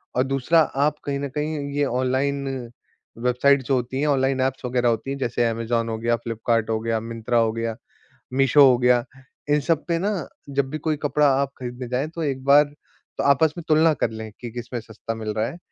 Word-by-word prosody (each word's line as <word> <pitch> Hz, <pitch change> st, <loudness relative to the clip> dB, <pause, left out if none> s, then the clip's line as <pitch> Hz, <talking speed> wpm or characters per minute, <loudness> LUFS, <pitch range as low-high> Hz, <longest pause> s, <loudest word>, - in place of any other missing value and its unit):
और 125 Hz, -, +3 dB
दूसरा 135 Hz, +5 st, +2 dB, 0.3 s
आप 150 Hz, 0 st, +1 dB
कहीं 140 Hz, -1 st, -2 dB
न 140 Hz, 0 st, -3 dB
कहीं 150 Hz, +1 st, -2 dB, 0.2 s
ये 145 Hz, 0 st, +2 dB
ऑनलाइन 130 Hz, +2 st, 0 dB, 0.7 s
वेबसाइट्स 125 Hz, +3 st, +2 dB
जो 140 Hz, -, +1 dB
होती 125 Hz, +1 st, -2 dB
हैं, 150 Hz, -, +1 dB
ऑनलाइन 135 Hz, -2 st, +1 dB
ऐप्स 130 Hz, 0 st, -1 dB
वगैरह 125 Hz, -1 st, +1 dB
होती 115 Hz, +4 st, -2 dB
हैं, 140 Hz, -, -3 dB
जैसे 120 Hz, -2 st, 0 dB
अमेज़न 115 Hz, 0 st, -1 dB
हो 110 Hz, -, -2 dB
गया, 120 Hz, +1 st, +1 dB
फ्लिपकार्ट 115 Hz, -1 st, -1 dB
हो 110 Hz, 0 st, 0 dB
गया, 115 Hz, 0 st, 0 dB
मिंत्रा 115 Hz, +1 st, -2 dB
हो 115 Hz, -1 st, +2 dB
गया, 115 Hz, 0 st, -3 dB, 0.6 s
मीशो 135 Hz, +2 st, +5 dB
हो 125 Hz, -, +4 dB
गया, 125 Hz, -1 st, +3 dB, 0.5 s
इन 145 Hz, 0 st, +4 dB
सब 155 Hz, +1 st, 0 dB
पे 170 Hz, -1 st, 0 dB
ना 195 Hz, -4 st, -2 dB, 0.2 s
जब 140 Hz, -1 st, 0 dB
भी 155 Hz, -, -2 dB
कोई 155 Hz, 0 st, -1 dB
कपड़ा 145 Hz, 0 st, +3 dB
आप 140 Hz, -1 st, -2 dB
खरीदने 125 Hz, 0 st, -6 dB
जाएँ, 130 Hz, +4 st, -1 dB
तो 165 Hz, 0 st, -5 dB
एक 135 Hz, -3 st, -2 dB
बार 140 Hz, +1 st, +7 dB, 0.5 s
तो -, -, -1 dB
आपस 145 Hz, +2 st, +4 dB
में 170 Hz, -, -5 dB
तुलना 160 Hz, +1 st, +5 dB
कर 130 Hz, -, -1 dB
लें 110 Hz, 0 st, -7 dB
कि 120 Hz, -, -6 dB
किसमें 120 Hz, +1 st, -5 dB
सस्ता 110 Hz, +1 st, -7 dB
मिल 110 Hz, -1 st, -5 dB
रहा 110 Hz, +1 st, 0 dB
है, 165 Hz, -, -7 dB
130 Hz, 215 wpm, -23 LUFS, 115-140 Hz, 0.7 s, बार